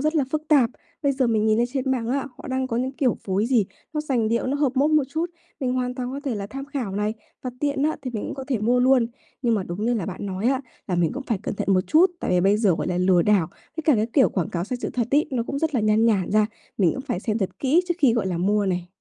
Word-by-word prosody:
rất 310 Hz, +3 st, 0 dB
là 290 Hz, -, +3 dB
phức 305 Hz, +1 st, -1 dB
tạp. 270 Hz, -7 st, +5 dB, 0.3 s
Bây 280 Hz, -1 st, +2 dB
giờ 260 Hz, -1 st, +1 dB
mình 220 Hz, -2 st, +2 dB
nhìn 215 Hz, 0 st, +3 dB
lên 240 Hz, -, +3 dB
trên 265 Hz, -1 st, -1 dB
mạng 240 Hz, -3 st, -1 dB
á, 275 Hz, +2 st, -1 dB
họ -, -, -10 dB
đang 260 Hz, 0 st, -1 dB
có 230 Hz, -, -2 dB
những 255 Hz, +2 st, -1 dB
kiểu 265 Hz, -3 st, +1 dB
phối 195 Hz, +3 st, 0 dB
gì, 240 Hz, -4 st, +3 dB, 0.3 s
nó 305 Hz, -, -1 dB
sành 255 Hz, -7 st, 0 dB
điệu, 235 Hz, +2 st, 0 dB
nó 270 Hz, +2 st, 0 dB
hợp 285 Hz, -3 st, +1 dB
mốt 285 Hz, +4 st, +3 dB
một 305 Hz, -2 st, +4 dB
chút, 325 Hz, +4 st, -2 dB, 0.3 s
mình 255 Hz, -2 st, 0 dB
hoàn 250 Hz, -1 st, -1 dB
toàn 250 Hz, -1 st, -4 dB
có 280 Hz, -, -4 dB
thể 265 Hz, -4 st, -1 dB
là 200 Hz, -1 st, -4 dB
tham 275 Hz, +6 st, -6 dB
khảo 275 Hz, -8 st, -4 dB
này, 210 Hz, +1 st, 0 dB, 0.3 s
và 255 Hz, -, -3 dB
tiện 285 Hz, -1 st, 0 dB
á 310 Hz, +1 st, +1 dB
thì 255 Hz, -, -4 dB
mình 215 Hz, -, -3 dB
cũng -, -, -4 dB
có 270 Hz, -, -6 dB
thể 255 Hz, -5 st, +1 dB
mua 240 Hz, +4 st, +2 dB
luôn. 255 Hz, -2 st, +4 dB, 0.4 s
Nhưng 235 Hz, -2 st, +2 dB
mà 205 Hz, -, 0 dB
đúng 185 Hz, +5 st, -4 dB
như 240 Hz, +1 st, +2 dB
là 205 Hz, -7 st, -2 dB
bạn 200 Hz, +1 st, -5 dB
nói 190 Hz, +3 st, -2 dB
á, 265 Hz, -1 st, +1 dB, 0.3 s
là 185 Hz, -, 0 dB
mình 170 Hz, -2 st, +2 dB
cũng 275 Hz, -, -5 dB
phải 230 Hz, -6 st, -1 dB
cẩn -, -, -3 dB
thận -, -, -4 dB
một 185 Hz, -, +4 dB
chút. 340 Hz, +4 st, +5 dB
Tại -, -, -2 dB
vì 180 Hz, -1 st, +3 dB
bây 195 Hz, +3 st, +4 dB
giờ, 210 Hz, -5 st, +3 dB
gọi -, -, -3 dB
là, 180 Hz, -1 st, -1 dB
lừa 180 Hz, -1 st, +4 dB
đảo, 200 Hz, -5 st, +3 dB, 0.3 s
với 320 Hz, -, -3 dB
cả 305 Hz, -, +5 dB
cái 220 Hz, -1 st, +1 dB
kiểu 270 Hz, -, +5 dB
quảng 180 Hz, -5 st, -2 dB
cáo 170 Hz, -1 st, -2 dB
sai 250 Hz, -, -3 dB
sự -, -, -3 dB
thật 240 Hz, -3 st, -1 dB
ấy, 290 Hz, +2 st, +3 dB
nó 250 Hz, -3 st, 0 dB
cũng 275 Hz, +4 st, -4 dB
rất 315 Hz, -1 st, -1 dB
là 245 Hz, -, +2 dB
nhan 215 Hz, +1 st, +3 dB
nhản 200 Hz, -6 st, +2 dB
ra, 215 Hz, +1 st, +4 dB, 0.3 s
mình 180 Hz, -5 st, +4 dB
cũng -, -, -5 dB
phải 225 Hz, -10 st, -3 dB
xem 220 Hz, 0 st, -1 dB
thật 195 Hz, -4 st, -3 dB
kỹ 285 Hz, +6 st, +3 dB
trước 345 Hz, -, +1 dB
khi, 265 Hz, -6 st, +5 dB
gọi 225 Hz, -4 st, 0 dB
là, 180 Hz, -2 st, -1 dB
mua 205 Hz, +3 st, +1 dB
này. 180 Hz, -2 st, -1 dB
240 Hz, 310 wpm, -24 LUFS, 205-275 Hz, 0.4 s, tạp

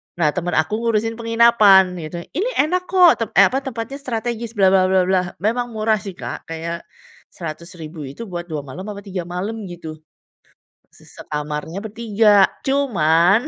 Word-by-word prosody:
nah 170 Hz, -3 st, +2 dB
temen 175 Hz, +1 st, -3 dB
aku 210 Hz, +8 st, +1 dB
ngurusin 225 Hz, 0 st, 0 dB
penginapan 230 Hz, -5 st, +5 dB
gitu. 170 Hz, +2 st, -6 dB
"Ini 400 Hz, -, -1 dB
enak 365 Hz, +4 st, -1 dB
kok," 365 Hz, -3 st, +6 dB
tep -, -, -16 dB
eee, 195 Hz, -, +7 dB
apa, 265 Hz, -, 0 dB
"tempatnya 260 Hz, +1 st, -5 dB
strategis" 235 Hz, -2 st, -4 dB
bla 195 Hz, -2 st, +5 dB
bla 190 Hz, -1 st, +4 dB
bla, 185 Hz, -1 st, +1 dB
memang 240 Hz, +3 st, 0 dB
murah 215 Hz, 0 st, +2 dB
sih, 200 Hz, -3 st, -7 dB
Kak, -, -, -7 dB
kayak 170 Hz, +1 st, -5 dB, 0.5 s
Rp100.000 165 Hz, -2 st, -8 dB
itu 140 Hz, +12 st, -8 dB
buat 175 Hz, -1 st, -5 dB
2 155 Hz, -3 st, -4 dB
malam 175 Hz, +8 st, -8 dB
apa 200 Hz, -1 st, -6 dB
3 185 Hz, -3 st, -5 dB
malam 205 Hz, +5 st, -4 dB
gitu. 165 Hz, -3 st, -8 dB, 0.9 s
Se -, -, -19 dB
sekamarnya 150 Hz, +4 st, -5 dB
bertiga. 215 Hz, -2 st, +3 dB, 0.2 s
Cuman 200 Hz, -, +3 dB
195 Hz, 155 wpm, -20 LUFS, 170-230 Hz, 0.9 s, eee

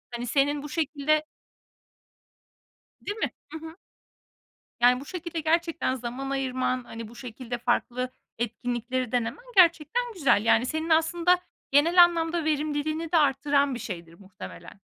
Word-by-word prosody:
Hani, 240 Hz, +1 st, -4 dB
senin 285 Hz, +3 st, +1 dB
bu 295 Hz, -, -7 dB
şekilde 310 Hz, -1 st, 0 dB, 1.8 s
Değil 415 Hz, -, -3 dB
mi? -, -, 0 dB, 0.2 s
Hı 320 Hz, -, -5 dB
hı. 320 Hz, +2 st, -10 dB, 1.1 s
Yani, 250 Hz, +1 st, +5 dB
bu 280 Hz, -, -10 dB
şekilde 340 Hz, -2 st, -5 dB
gerçekten 330 Hz, -3 st, 0 dB
zaman 255 Hz, +2 st, -5 dB
ayırman, 255 Hz, -2 st, -1 dB
hani, 225 Hz, -1 st, -8 dB
bu 235 Hz, -, -14 dB
şekilde 245 Hz, 0 st, -6 dB
farklı 245 Hz, +1 st, -1 dB, 0.3 s
etkinlikleri 240 Hz, +1 st, -2 dB
denemen 245 Hz, -, -2 dB
gerçekten 335 Hz, -, +4 dB
güzel. 265 Hz, -, +3 dB
Yani 230 Hz, +2 st, +4 dB
senin 315 Hz, +3 st, -3 dB
aslında 340 Hz, +3 st, +3 dB, 0.3 s
genel 335 Hz, +6 st, +6 dB
anlamda 335 Hz, -1 st, 0 dB
verimliliğini 310 Hz, +1 st, -1 dB
de -, -, +5 dB
artıran 280 Hz, -1 st, +2 dB
bir 245 Hz, -, -6 dB
şeydir 170 Hz, -4 st, -7 dB
muhtemelen. 195 Hz, 0 st, -11 dB
280 Hz, 130 wpm, -27 LUFS, 245-325 Hz, 1.8 s, genel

